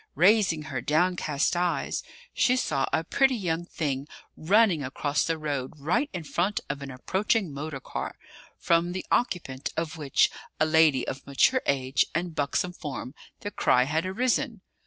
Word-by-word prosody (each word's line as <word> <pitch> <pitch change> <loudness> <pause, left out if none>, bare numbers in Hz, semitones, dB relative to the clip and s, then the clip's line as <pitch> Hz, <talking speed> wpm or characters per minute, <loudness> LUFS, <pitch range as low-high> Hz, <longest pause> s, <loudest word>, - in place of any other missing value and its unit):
Raising 185 -1 +4
her - - -4
downcast 155 -1 +1
eyes, 175 0 0 0.3
she 250 - +3
saw 150 - 0
a 160 - +1
pretty 265 - +2
young 175 -5 -2
thing 140 -3 -3 0.3
running 190 -2 +3
across 140 +2 -1
the 165 -1 -1
road 145 -4 -3
right 175 - 0
in 175 -4 -5
front 175 +8 0
of 140 - -7
an 140 - -6
approaching 190 - 0
motor 145 0 -5
car, - - -5 0.4
from 170 +1 +2
the 185 - -4
occupant 165 - -1
of 165 0 -2
which, 145 -4 +2 0.3
a 155 - +4
lady 155 -4 +4
of 130 - -6
mature 195 - +3
age 135 -1 +2
and 170 0 -1
buxom 155 +4 -1
form, 145 -6 -6 0.3
the 205 - -4
cry 125 - +3
had 160 +6 -1
arisen. 235 +2 0
160 Hz, 155 wpm, -27 LUFS, 140-185 Hz, 0.4 s, Raising